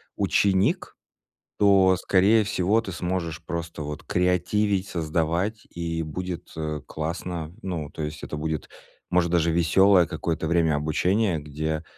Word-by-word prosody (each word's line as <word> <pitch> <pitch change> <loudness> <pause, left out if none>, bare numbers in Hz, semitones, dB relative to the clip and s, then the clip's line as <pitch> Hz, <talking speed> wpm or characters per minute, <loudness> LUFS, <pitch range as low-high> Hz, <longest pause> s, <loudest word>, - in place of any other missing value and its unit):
ученик, 95 -1 +1 0.6
то, 95 -2 +5
скорее 100 +4 +4
всего, 105 +2 +1
ты 100 - -6
сможешь 85 -2 -3
просто 85 -2 -4
вот 75 0 -6
креативить, 95 +2 +1
создавать, 85 +6 -1
и 85 -1 -3
будет, 90 +3 -6
э, 75 -2 -3
классно. 80 +1 -4
Ну, 85 -6 -4
то - - -7
есть 75 0 -6
это 75 - -5
будет, 80 0 -3 0.4
может, 90 -1 +2
даже 85 -1 +3
весёлое 90 +3 +5
какое-то 80 0 -2
время 80 -2 +2
обучения, 90 +5 +1
где 75 +2 -3
85 Hz, 130 wpm, -25 LUFS, 80-95 Hz, 0.6 s, то